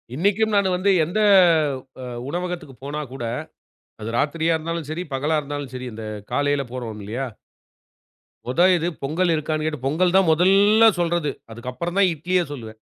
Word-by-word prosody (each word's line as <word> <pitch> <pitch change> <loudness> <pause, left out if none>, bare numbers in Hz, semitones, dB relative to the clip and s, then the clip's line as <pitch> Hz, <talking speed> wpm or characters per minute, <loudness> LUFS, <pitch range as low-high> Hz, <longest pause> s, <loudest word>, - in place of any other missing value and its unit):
இன்னைக்கும் 205 +7 +1
நான் 200 -1 +3
வந்து 190 +2 +2
எந்த, 175 +7 -2 0.8
அ - - -7 0.3
உணவகத்திற்கு 175 -4 -4
போனா 145 +2 -4
கூட 120 -3 -5 0.8
அது 110 - -5
ராத்திரியா 165 +3 +1
இருந்தாலும் 165 -1 -4
சரி, 165 +3 -3
பகலா 150 +4 0
இருந்தாலும் 145 -2 -6
சரி 130 0 -5
இந்த 110 0 -8 0.3
காலையில 145 +1 +1
போறோம் 115 -4 -5
இல்லியா? 115 +7 -4 1.2
மொத 150 +8 +3
இது 170 0 -1 0.2
பொங்கல் 170 +6 +1
இருக்கான்னு 155 0 -2
கேட்டு, 150 -4 -3
பொங்கல் 175 +6 +2
தான் 190 -3 +5
மொதல்ல 200 +6 +5
சொல்றது. 170 -3 0 0.2
அதற்கு 120 +3 -6
அப்புறம் 170 +8 -4
தான் 195 -2 +5
இட்லிய 175 +3 0
சொல்லுவேன். 110 -6 -8
155 Hz, 155 wpm, -22 LUFS, 135-180 Hz, 1.2 s, தான்